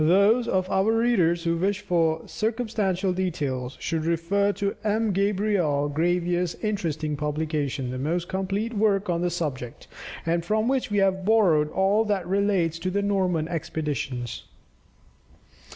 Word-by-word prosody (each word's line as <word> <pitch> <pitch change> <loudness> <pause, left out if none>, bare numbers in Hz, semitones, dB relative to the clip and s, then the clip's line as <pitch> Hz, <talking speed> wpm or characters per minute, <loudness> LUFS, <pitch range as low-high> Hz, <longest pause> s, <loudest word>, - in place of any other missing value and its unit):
Those 200 +8 +4
of 185 -3 +1
our 195 +4 +2
readers 180 -8 +2
who 170 -1 +1
wish 200 +3 0
for 165 -4 0
circumstantial 215 -5 -1
details, 145 -9 -2
should 160 -1 -2
refer 170 +5 +1
to 200 0 -2
M. 215 0 +1
Gabriel 195 -7 +1
Gravier's 175 +3 0
interesting 160 -8 -1
publication, 150 -3 -2
the 130 - -4
most 170 +5 -1
complete 195 +4 -2
work 205 -3 +1
on 170 0 -1
the 175 - +1
subject, 145 -8 -4 0.4
and 170 +1 0
from 215 +5 0
which 265 0 0
we 205 - 0
have 190 -1 +2
borrowed 180 -8 +3
all 195 +6 +2
that 200 -4 -1
relates 185 -4 +1
to 185 - -2
the 200 +2 -1
Norman 185 -6 +1
expeditions. 145 -7 -4
180 Hz, 140 wpm, -25 LUFS, 160-200 Hz, 0.4 s, Those